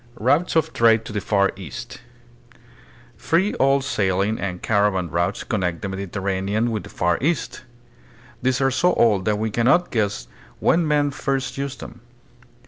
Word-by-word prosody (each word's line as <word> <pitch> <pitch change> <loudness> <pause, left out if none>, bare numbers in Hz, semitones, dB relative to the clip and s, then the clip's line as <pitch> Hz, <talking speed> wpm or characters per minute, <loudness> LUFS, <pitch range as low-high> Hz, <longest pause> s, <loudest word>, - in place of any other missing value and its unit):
Routes 145 +11 +2
of 160 - +1
Trade 115 -1 +3
to - - -7
the 105 - -2
Far 100 0 +2
East. 120 +5 -9 1.2
Three 190 +6 +1
old 135 0 +3
sail 95 -7 0
ing 105 +3 -1
and 90 -2 -4
caravan 100 -4 +1
routes 85 +1 -1
connect 90 -6 -2
the 100 - -2
Mediterranean 100 +3 -2
with 110 -2 -2
the - - -12
Far 85 0 0
East. 155 +2 -1 0.8
They 130 - +2
are 135 0 +3
so 175 +7 +2
old 105 -5 +3
that 105 -1 +1
we 110 +1 -2
can 115 +2 +1
not 175 +6 +3
guess 105 - -1 0.3
when 165 -1 +2
men 145 -1 +2
first 135 -1 -2
used 140 0 -5
them. 120 - -10
110 Hz, 165 wpm, -22 LUFS, 100-135 Hz, 1.2 s, Trade